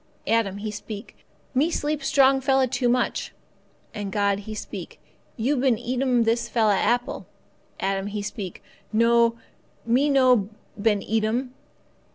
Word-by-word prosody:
Adam 220 -4 +1
he 215 +1 -4
speak, 210 +1 -8 0.4
'Me 280 +5 +2
sleep 300 -3 -2
strong 270 -1 +4
fella 265 0 +3
too 245 0 0
much.' 250 0 0 0.6
And 205 -3 -5
God 200 -1 +1
He 215 - -5
speak, - - -7 0.4
'You 260 +6 +1
been 255 -3 +2
eat 245 +2 -3
'm 250 -3 +3
this 235 +1 0
fella 220 -4 +3
apple.' 245 +6 0 0.5
Adam 195 0 -1
he 205 0 -4
speak, 200 -3 -6 0.3
'No, 230 +1 +3 0.5
me 255 +6 +3
no 255 -7 +4 0.3
been 210 -2 +2
eat 220 0 0
'm. 250 +4 -1
235 Hz, 145 wpm, -24 LUFS, 210-255 Hz, 0.6 s, strong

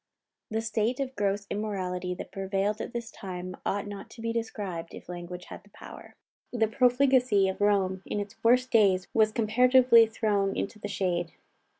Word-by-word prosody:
The 220 0 -1
state 230 +2 -1
of 265 -1 -3
gross 200 0 -1
immorality 185 -4 -3
that - - -8
prevailed 195 +2 -1
at - - -5
this 235 -1 -5
time 185 -1 -7
ought 205 +1 -1
not 200 -1 -8
to 230 - -12
be 230 0 -2
described, 200 -7 -4
if - - -12
language 175 0 -7
had - - -10
the 205 - -22
power. - - -12 0.4
The 225 -3 +1
profligacy 250 -3 +3
of 190 +1 -4
Rome 195 -2 +2
in - - -2
its 205 +2 -7
worst 250 +2 +4
days 195 -5 +4
was 215 -1 +4
comparatively 235 +1 +5
thrown 205 -3 0
into 215 +2 -4
the 205 - -5
shade. 175 -4 -2
205 Hz, 175 wpm, -28 LUFS, 190-230 Hz, 0.4 s, comparatively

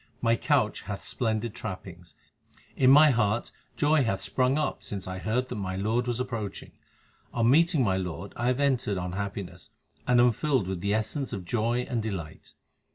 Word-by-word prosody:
My 115 -2 +3
couch 130 -4 +1
hath 100 0 -6
splendid 110 -2 -2
trappings. 90 -6 -8 0.6
In 130 - +4
my 150 +2 +8
heart 110 -1 0 0.3
joy 150 -1 +3
hath 95 -5 0
sprung 130 +7 +1
up 155 - -1
since 100 -3 -6
I 95 0 -5
heard 120 +6 -1
that 125 - -4
my 95 -2 -3
Lord 110 +5 0
was 120 0 -1
approaching. 115 -6 -4 0.6
On 115 -1 +2
meeting 165 -1 +4
my 95 -4 +1
Lord 90 -5 -5
I 120 - -1
have 125 +1 +1
entered 130 -8 +1
on 90 0 -3
happiness 95 -2 -5 0.4
and 125 -1 +4
am 120 0 +6
filled 130 -2 0
with 95 -2 -3
the 100 +2 +1
essence 110 +5 -2
of 95 -4 -5
joy 120 +4 0
and 120 -2 -2
delight. 95 -8 -6
110 Hz, 180 wpm, -27 LUFS, 95-125 Hz, 0.6 s, my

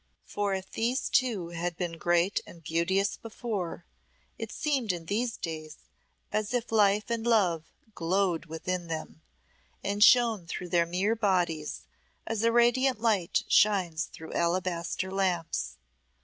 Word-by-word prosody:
For 200 -1 -1
if 190 0 -6
these 245 +4 0
two 220 -10 +1
had 175 0 -3
been 170 -2 -3
great 175 +3 +2
and 170 -1 -13
beauteous 180 +5 +1
before, 215 -7 -5 0.5
it - - -5
seemed 270 -8 0
in 170 -2 -6
these 230 +6 -1
days 155 -2 -6 0.5
as 215 +3 -1
if 240 -2 -2
life 210 0 +3
and 230 -1 -1
love 190 -9 +2 0.3
glowed 175 -1 0
within 175 +2 -3
them, 160 -1 -6 0.6
and 200 +1 +2
shone 230 -7 +5
through 180 +1 -5
their 170 -1 +3
mere 190 +6 +1
bodies 175 - 0 0.4
as 225 -1 -2
a 230 0 +3
radiant 240 +1 +3
light 210 -7 +1
shines 185 -6 +3
through 160 - -10
alabaster 175 +1 -1
lamps. 180 - -1
190 Hz, 135 wpm, -29 LUFS, 170-220 Hz, 0.6 s, shone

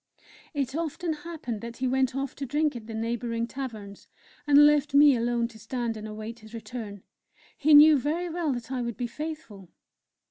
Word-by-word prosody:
It 275 -1 -2
often 330 +1 -2
happened 300 -8 -6
that 235 0 -8
he 260 - -1
went 260 0 +1
off 275 -1 -3
to 280 - -4
drink 295 +2 0
at 225 -2 -8
the 225 - -6
neighbouring 230 +1 -2
taverns, 225 -6 -8 0.4
and 290 0 +7
left 295 -1 +3
me 290 -1 +7
alone 235 0 0
to 220 -2 -15
stand 235 +1 -3
and 215 0 -7
await 215 +2 -7
his 220 +1 -12
return 220 -4 -7 0.5
he 300 +1 +5
knew 300 0 +8
very 320 +6 -2
well 335 -3 -1
that 240 0 -7
I 255 -2 -2
would 235 -3 -4
be 245 - -2
faithful! 235 - -7
250 Hz, 185 wpm, -27 LUFS, 230-295 Hz, 0.5 s, knew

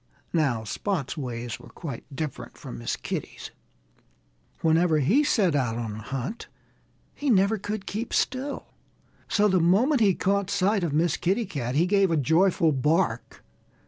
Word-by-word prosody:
Now, 135 -9 +1
Spot's 155 - -3
ways 120 -5 -5
were - - -14
quite 140 -9 -7
different 150 0 -6
from 60 - -8
Miss - - -2
Kitty's. - - -6 1.1
Whenever 165 0 +3
he 200 - +3
set 200 - +2
out 125 -5 0
on 115 -3 -4
a 110 - -7
hunt 135 - -5 0.7
he 290 - -3
never 205 -1 +3
could 205 +1 -4
keep 220 +4 -4
still. 265 +3 -2 0.5
So 210 0 +3
the 185 -2 +3
moment 225 - +3
he 195 -4 +4
caught 200 0 0
sight 200 0 +1
of 165 - 0
Miss 160 +2 +1
Kitty 195 +6 0
Cat 135 -9 -4
he 165 +4 +4
gave 195 0 +3
a 165 - +1
joyful 165 +3 +3
bark. 150 -2 0
170 Hz, 155 wpm, -26 LUFS, 135-200 Hz, 1.1 s, he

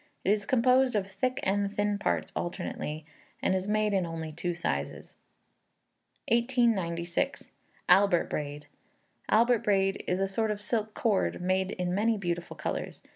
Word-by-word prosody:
It 195 - +4
is 205 -1 0
composed 255 0 +3
of 200 -2 +1
thick 250 +7 -2
and 200 +1 +1
thin 205 -1 0
parts - - -1
alternately, 155 -3 -4 0.3
and - - +1
is 190 +1 -1
made 215 0 +1
in 190 -2 +2
only 165 -2 -5
two 170 +2 -3
sizes. 70 - -3 1.1
1896. 225 -9 +1 0.4
Albert 185 -1 +5
Braid. 145 0 -4 0.6
Albert 235 +2 +4
braid 195 -2 +1
is 180 +1 0
a 195 - +1
sort 220 +3 0
of 210 -1 -2
silk 215 0 -2
cord, 215 -4 +1
made 185 +1 0
in 180 -2 -2
many 220 +3 +2
beautiful 175 -3 -3
colours. - - -4
195 Hz, 145 wpm, -29 LUFS, 175-215 Hz, 1.1 s, Albert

